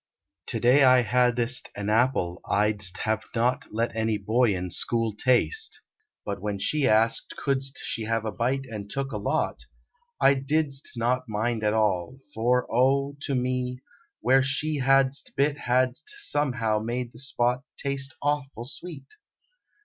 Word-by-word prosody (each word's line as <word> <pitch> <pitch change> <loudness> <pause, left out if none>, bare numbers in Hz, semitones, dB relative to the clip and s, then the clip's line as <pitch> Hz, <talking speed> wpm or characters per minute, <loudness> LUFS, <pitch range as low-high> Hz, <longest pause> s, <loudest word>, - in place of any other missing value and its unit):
To - - -2
day 130 +4 +5
I 130 -1 +6
hadst 125 +1 +1
an 100 0 -4
apple 110 -7 +1
I 105 +1 +3
dst 100 -3 -3
have 110 0 -1
not 125 +4 +1
Let 115 +2 -1
any 110 -1 0
boy 110 +1 +2
in 90 0 -4
school 115 +2 +1
taste, 285 - +1 0.5
but 100 -1 -4
when 105 -1 -2
she 145 +6 +1
Asked 115 +2 +2
couldst 135 -1 -1
she 110 - -2
have 115 0 -1
a 110 - -2
bite 130 +4 -1
and 105 -5 -7
took 135 +2 -3
a - - -3
lot, - - -1 0.5
I 140 - +6
didst 140 +1 -1
not 125 +1 -1
mind 110 +1 -1
at 105 +1 +2
all, 105 +1 0 0.2
for, 125 +1 +1
oh, 135 +4 +2
to 140 -2 -2
me, 125 0 -1 0.4
Where 135 +1 +4
she 145 +3 0
hadst 135 0 +2
bit 140 +1 +2
hadst 130 - 0
somehow 120 - 0
made 120 +2 -3
the 115 - -12
spot 125 -2 0 0.2
Taste 135 -1 -2
awful 145 -4 -2
sweet! 145 +1 -8
125 Hz, 155 wpm, -26 LUFS, 110-135 Hz, 0.5 s, I